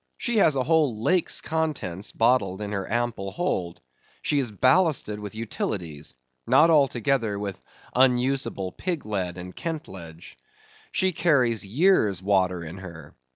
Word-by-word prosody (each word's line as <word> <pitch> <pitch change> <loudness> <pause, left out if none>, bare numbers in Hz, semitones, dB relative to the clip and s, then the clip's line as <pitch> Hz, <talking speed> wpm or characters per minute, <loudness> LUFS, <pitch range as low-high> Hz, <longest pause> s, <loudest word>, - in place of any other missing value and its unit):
She 235 -2 -1
has 160 -8 +4
a 130 - +1
whole 145 -8 +1
lake's 180 +2 +2
contents 150 - -3
bottled 115 -5 +2
in 105 -1 -5
her 100 -1 -4
ample 120 -4 -1
hold. 90 - -3 0.4
She 145 - +1
is 130 -4 -1
ballasted 130 - +2
with 105 0 -8
utilities; 85 - -4 0.3
not 135 +7 +5
altogether 130 -6 +2
with 100 -2 -5 0.3
unusable 125 -6 +1
pig 175 - -4
lead 95 -4 -3
and 90 0 -8
kentledge. 95 - -7 0.5
She 190 -1 +1
carries 125 - +2
years' 115 - +3
water 95 -2 +1
in 85 +4 -8
her. 85 -5 -11
110 Hz, 135 wpm, -25 LUFS, 95-145 Hz, 0.5 s, not